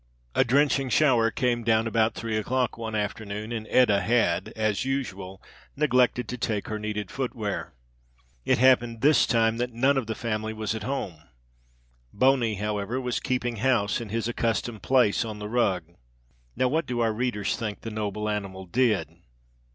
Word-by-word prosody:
A - - +4
drenching 135 +1 +2
shower 125 -6 +4
came 120 -2 0
down 110 0 +2
about 115 0 +1
three 115 -1 -3
o'clock 125 +3 0
one 110 -1 -5
afternoon 105 +1 -4
and 110 -2 -4
Etta 105 -6 +4
had, 100 -4 +1
as 110 -2 0
usual, 100 -9 -4 0.4
neglected 125 -4 +2
to 125 +3 -5
take 110 -4 -2
her 110 -1 -3
needed 105 -2 -4
footwear. 110 - -4 0.7
It - - +2
happened 120 -2 +3
this 150 +1 +5
time 115 -1 +2
that 125 +1 -2
none 135 +4 +2
of 130 -4 -1
the 110 - -3
family 110 -1 -3
was 110 0 -3
at 110 - -5
home. 105 - -4 0.9
Boney, 125 -1 +2
however, 105 +4 -2
was 125 -2 -2
keeping 125 -3 -2
house 115 -2 +1
in 115 - -7
his 115 +1 -2
accustomed 115 -2 -2
place 125 -4 +3
on 110 -2 -6
the 105 0 -6
rug. 105 -6 +1 0.7
Now, 130 - +2
what 160 +6 0
do 125 -1 -2
our 115 -1 +2
readers 110 -3 -1
think 105 -3 -5
the 115 - -6
noble 105 0 -3
animal 100 -3 -4
did. 105 - +1
115 Hz, 165 wpm, -26 LUFS, 105-125 Hz, 0.9 s, this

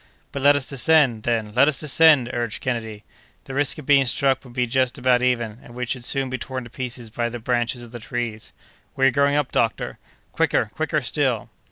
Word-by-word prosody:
"But 140 - -5
let 145 +1 +6
us 140 -3 -1
descend, 135 -4 +3
then! 110 -2 -2
let 130 +5 +5
us 150 -4 +1
descend!" 150 -3 +4
urged 120 -3 -2
Kennedy. 110 -4 -4 0.4
"The 135 - -9
risk 145 0 +2
of 155 - -9
being 140 -1 +4
struck 135 +2 +1
would 125 -3 -14
be 125 0 0
just 130 +2 0
about 125 -1 +2
even, 120 -3 -1
and 120 - -14
we 125 0 -3
should 125 0 -4
soon 135 +2 +1
be 130 0 -4
torn 130 -1 -5
to 120 - -13
pieces 120 -3 -6
by 120 +1 -2
the 120 - -6
branches 120 +1 -1
of 120 - -12
the 120 - -8
trees!" 115 -1 -5 0.4
"We 135 - +2
are 135 - +5
going 140 +1 +2
up, 145 -2 0
doctor!" 115 -1 -1 0.3
"Quicker, - - 0
quicker - - -1
still!" - - -1
125 Hz, 215 wpm, -22 LUFS, 120-135 Hz, 0.4 s, let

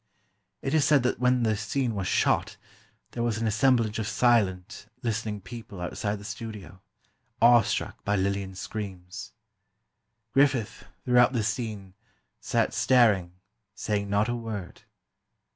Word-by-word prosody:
It 135 - -2
is 155 -2 +4
said 145 -3 +4
that 125 - 0
when 125 -1 +2
the 110 -1 +2
scene 115 +4 -1
was 100 -3 -3
"shot," - - +1 0.5
there 120 - -4
was 115 -2 0
an 115 - -2
assemblage 110 0 +2
of 110 - -2
silent, 105 -5 +1 0.2
listening 110 -3 -2
people 100 0 -9
outside 100 +4 -3
the 100 - -10
studio, 105 -4 -8 0.6
awe 120 0 +7
struck - - -3
by 105 - 0
Lillian's 95 -1 -2
screams. 95 -4 -7 1.0
Griffith, 135 -5 +1 0.2
throughout 125 0 +5
the 115 -4 0
scene, 105 -3 -4 0.5
sat - - 0
staring, 105 -9 +3 0.4
saying 100 -2 -2
not 100 +2 +2
a 120 - -1
word. 110 -6 -6
110 Hz, 135 wpm, -27 LUFS, 100-120 Hz, 1.0 s, awe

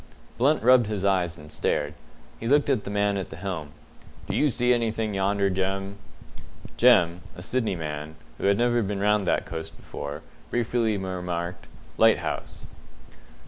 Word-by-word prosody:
Blunt 145 +3 +3
rubbed 125 -2 +6
his 105 -3 -2
eyes 90 -4 +1
and 75 0 -13
stared. 75 0 -1 0.5
He 115 - -4
looked 145 +2 +4
at 125 -6 0
the - - -4
man 100 0 +1
at 95 - -4
the - - -8
helm. 90 -4 -5 0.6
"Do - - -2
you 150 - +3
see 125 0 +2
anything 115 -2 -1
yonder, 100 0 +1
Jem?" 95 +1 -2 0.8
Jem 90 -8 +5
a 90 - -8
Sydney 115 -1 -1
man, 75 -1 -5 0.2
who - - -3
had 100 0 +4
never 120 0 +2
been 100 -1 -2
round 105 -1 +2
that - - +1
coast 80 -1 -7
before 70 +2 -7 0.3
briefly 115 -2 0
remarked, 90 -2 -4 0.3
"Lighthouse." - - +1
100 Hz, 155 wpm, -26 LUFS, 90-115 Hz, 0.8 s, rubbed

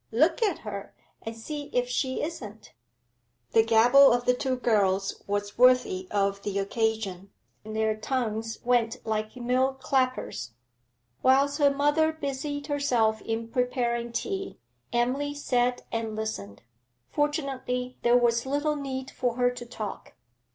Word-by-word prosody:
Look 310 - +3
at 410 -7 +2
her, 200 -2 -6 0.3
and 225 0 -7
see 290 +5 -6
if 245 0 +1
she 260 +1 -1
isn't.' 220 -10 -7 0.8
The 225 - +6
gabble 240 +5 +6
of 245 0 +1
the 250 - +4
two 260 +1 -1
girls 200 -5 +1
was 205 +1 -3
worthy 250 -7 +4
of 200 -1 0
the 200 -1 -3
occasion 200 -2 -1 0.3
their 220 0 -1
tongues 225 -1 -2
went 240 -1 +2
like 215 0 -2
mill 255 +2 +1
clappers. 255 - -1 0.7
Whilst 275 +3 +3
her 285 -1 +6
mother 295 +3 +2
busied 285 -1 -4
herself 245 -7 +1
in 225 0 -3
preparing 240 -1 -1
tea, 390 - -3 0.3
Emily 265 +5 0
sat 250 -3 0
and 225 -1 -2
listened; 165 - -5 0.4
fortunately 265 - -2
there 240 +1 +5
was 235 0 +2
little 290 +2 0
need 265 -2 -5
for 245 -2 -1
her 245 0 +2
to 245 -1 -8
talk. 215 -4 -7
245 Hz, 135 wpm, -27 LUFS, 220-270 Hz, 0.8 s, The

